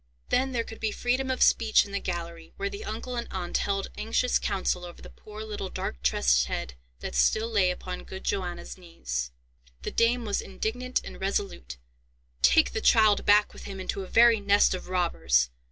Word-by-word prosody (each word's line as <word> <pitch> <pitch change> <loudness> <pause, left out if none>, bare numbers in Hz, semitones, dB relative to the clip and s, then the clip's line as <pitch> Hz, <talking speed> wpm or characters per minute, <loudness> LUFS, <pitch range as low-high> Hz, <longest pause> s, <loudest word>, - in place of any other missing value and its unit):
Then 265 +1 +1
there 235 -2 -1
could 225 - -10
be 220 -1 -1
freedom 255 +4 -1
of 260 - +2
speech 225 -2 +4
in 200 - -11
the 200 - -1
gallery, 170 -2 -6
where 395 0 -2
the 405 +1 -7
uncle 245 - -5
and 235 -1 -3
aunt 180 -2 -2
held 195 -1 -2
anxious 230 +3 +1
counsel 185 -2 -1
over 175 -1 -9
the - - -12
poor 215 0 -10
little 210 -3 -5
dark - - -5
tressed 60 -1 +3
head 60 -1 -4 0.3
that - - -5
still 140 - +2
lay 205 -5 +2
upon 180 0 -5
good 190 - -8
Johanna's 185 -2 -3
knees. 65 - -4 0.5
The - - -3
dame 235 +1 +2
was 205 -2 -1
indignant 245 +6 -3
and - - -10
resolute: 190 - -3 0.6
"Take 65 0 +5
the - - -2
child 215 -2 +4
back 205 0 +5
with - - -11
him 195 -1 -7
into 190 +1 -3
a 190 - -7
very 230 +1 +5
nest 200 0 +4
of 185 -1 -6
robbers! 70 - +1
200 Hz, 190 wpm, -27 LUFS, 175-225 Hz, 0.6 s, Take